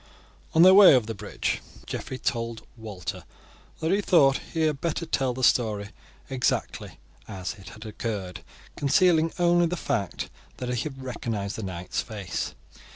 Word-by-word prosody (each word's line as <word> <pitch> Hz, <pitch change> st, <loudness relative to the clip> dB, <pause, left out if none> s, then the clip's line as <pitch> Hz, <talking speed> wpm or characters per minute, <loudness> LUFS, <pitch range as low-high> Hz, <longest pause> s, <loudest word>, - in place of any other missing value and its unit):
On 165 Hz, -, +7 dB
their 185 Hz, +1 st, +9 dB
way 195 Hz, -7 st, +9 dB
over 125 Hz, -4 st, +2 dB
the 115 Hz, -, -4 dB
bridge 100 Hz, -, -3 dB, 0.2 s
Geoffrey 130 Hz, -, -5 dB
told 115 Hz, -3 st, -3 dB
Walter 105 Hz, -6 st, -6 dB, 0.6 s
that 160 Hz, +2 st, +1 dB
he 200 Hz, +2 st, +3 dB
thought 140 Hz, -8 st, +4 dB
he 165 Hz, -, -1 dB
had 155 Hz, -3 st, +1 dB
better 170 Hz, 0 st, -1 dB
tell 135 Hz, -5 st, 0 dB
the 130 Hz, +1 st, -5 dB
whole -, -, -4 dB
story 105 Hz, -5 st, +2 dB, 0.4 s
exactly 130 Hz, -2 st, -2 dB, 0.3 s
as 95 Hz, -2 st, -5 dB
it 100 Hz, -2 st, -12 dB
had 110 Hz, +2 st, -11 dB
occurred, 105 Hz, -4 st, -5 dB, 0.3 s
concealing 165 Hz, +3 st, +3 dB
only 175 Hz, -1 st, +4 dB
the 180 Hz, +2 st, -3 dB
fact 100 Hz, -, -2 dB, 0.3 s
that 125 Hz, -, -4 dB
he 120 Hz, -, -1 dB
had 135 Hz, -1 st, -11 dB
recognized 110 Hz, -5 st, -3 dB
the -, -, -5 dB
knight's 90 Hz, -3 st, -3 dB
face. 95 Hz, -, -5 dB
125 Hz, 160 wpm, -26 LUFS, 105-160 Hz, 0.6 s, their